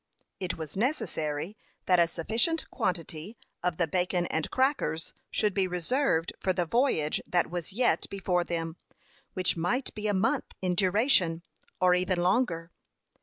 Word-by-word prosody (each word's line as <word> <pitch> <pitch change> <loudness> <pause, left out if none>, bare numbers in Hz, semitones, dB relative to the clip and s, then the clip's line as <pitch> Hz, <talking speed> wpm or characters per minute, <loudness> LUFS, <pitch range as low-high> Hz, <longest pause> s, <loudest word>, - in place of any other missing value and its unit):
It 185 -2 -3
was 160 -2 -6
necessary 190 - -1 0.3
that 180 -1 +4
a 170 - +5
sufficient 225 - 0
quantity 180 - -3 0.2
of 175 -2 -1
the 170 - +2
bacon 180 +1 0
and 160 -1 -1
crackers 260 - 0 0.2
should 210 -2 +1
be 190 -1 +1
reserved 180 - 0
for 185 - +1
the 175 -1 0
voyage 170 - +1
that 175 -2 +1
was 175 +1 -3
yet 240 +5 +2
before 185 -3 0
them, 165 -1 -3 0.6
which 185 -1 +1
might 210 +11 -1
be 215 0 -3
a 205 - +1
month 230 +8 0
in 185 -1 0
duration, 185 -3 +3 0.4
or 180 -1 +5
even 180 0 +1
longer. 175 -3 +1
180 Hz, 150 wpm, -29 LUFS, 165-215 Hz, 0.6 s, a